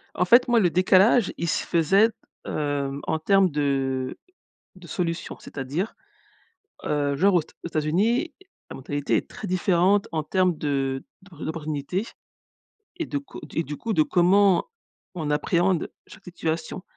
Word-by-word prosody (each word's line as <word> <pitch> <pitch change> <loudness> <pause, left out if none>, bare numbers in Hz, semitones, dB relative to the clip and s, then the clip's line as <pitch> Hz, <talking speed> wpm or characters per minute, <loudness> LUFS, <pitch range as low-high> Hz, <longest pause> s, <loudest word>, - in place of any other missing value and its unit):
En 180 - +2
fait, 240 +7 +5
moi, 240 -1 +4
le 180 -4 +3
décalage 190 +5 +4
il 170 - -3
se - - 0
faisait, 195 +7 +3 0.4
heu, 145 -2 -2
en 160 - 0
termes 195 +2 +3
de 135 -3 -1 0.6
de 180 -2 -13
solutions. 170 +1 -3
C'est-à-dire, 145 +10 -4 0.9
heu, 145 -1 0
genre 190 +5 +3
aux 170 - +3
t - - -22
aux - - -3
Etats 165 -2 -1
États-Unis, 225 - +1 0.4
la - - -7
mentalité 145 +2 -2
est - - -4
très 205 - -7
différente 185 +2 +2
en 155 -1 -1
termes 180 +1 +1
de 135 -3 -1 0.2
d'o 180 -5 -11
d'opportunités 155 +5 -3 0.9
et 330 - -2
de 285 - -2
co 280 - -11
et 165 - +1
du 150 0 -6
coup 225 - -3
de 155 -6 +4
comment 185 +3 +3 0.5
on 155 -4 -3
appréhende 175 +4 +1 0.2
chaque - - -15
situation. 165 0 -4
170 Hz, 155 wpm, -25 LUFS, 150-195 Hz, 0.9 s, fait